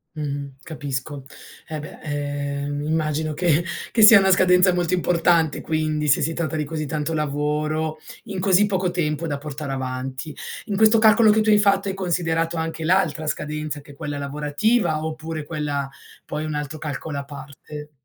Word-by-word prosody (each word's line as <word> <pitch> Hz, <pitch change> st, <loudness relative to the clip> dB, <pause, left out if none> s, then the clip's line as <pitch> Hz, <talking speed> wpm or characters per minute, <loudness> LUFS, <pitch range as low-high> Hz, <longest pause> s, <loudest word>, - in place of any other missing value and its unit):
Mh-mh, 140 Hz, -2 st, -4 dB
capisco. 145 Hz, -2 st, -5 dB, 0.4 s
Eh 155 Hz, -1 st, -5 dB
beh, 155 Hz, -, -10 dB
ehm, 145 Hz, -1 st, -3 dB
immagino 155 Hz, -1 st, -1 dB
che 170 Hz, 0 st, +2 dB, 0.3 s
che 225 Hz, -, +3 dB
sia 210 Hz, -1 st, +10 dB
una 190 Hz, 0 st, +3 dB
scadenza 180 Hz, 0 st, +5 dB
molto 175 Hz, 0 st, 0 dB
importante 170 Hz, -2 st, +2 dB
quindi, 155 Hz, -1 st, -1 dB
se 145 Hz, -, +4 dB
si 165 Hz, +3 st, 0 dB
tratta 160 Hz, -2 st, -2 dB
di 150 Hz, -, -1 dB
così 155 Hz, -1 st, -4 dB
tanto 155 Hz, +2 st, -2 dB
lavoro 150 Hz, +1 st, -1 dB, 0.3 s
in 195 Hz, -, -6 dB
così 195 Hz, +1 st, +4 dB
poco 185 Hz, -3 st, 0 dB
tempo 165 Hz, -2 st, -1 dB
da 145 Hz, -3 st, -2 dB
portare 145 Hz, -1 st, -6 dB
avanti. 130 Hz, +2 st, -4 dB, 0.3 s
In 205 Hz, -2 st, -3 dB
questo 220 Hz, +2 st, +5 dB
calcolo 220 Hz, 0 st, +6 dB
che 220 Hz, -, +3 dB
tu 215 Hz, -, 0 dB
hai 210 Hz, -, +6 dB
fatto, 200 Hz, -1 st, +3 dB
hai 190 Hz, -, -1 dB
considerato 165 Hz, -3 st, -1 dB
anche 160 Hz, 0 st, -3 dB
l'altra 165 Hz, -3 st, +1 dB
scadenza, 150 Hz, 0 st, -3 dB
che 145 Hz, 0 st, -14 dB
è -, -, -14 dB
quella 145 Hz, 0 st, -5 dB
lavorativa, 150 Hz, +6 st, 0 dB
oppure 155 Hz, -1 st, -5 dB
quella 145 Hz, -3 st, -3 dB, 0.4 s
poi 150 Hz, +1 st, -4 dB
è -, -, -3 dB
un 150 Hz, -, -3 dB
altro 150 Hz, +1 st, -4 dB
calcolo 150 Hz, 0 st, -5 dB
a -, -, -5 dB
parte? 150 Hz, +1 st, -10 dB
155 Hz, 175 wpm, -23 LUFS, 145-175 Hz, 0.4 s, sia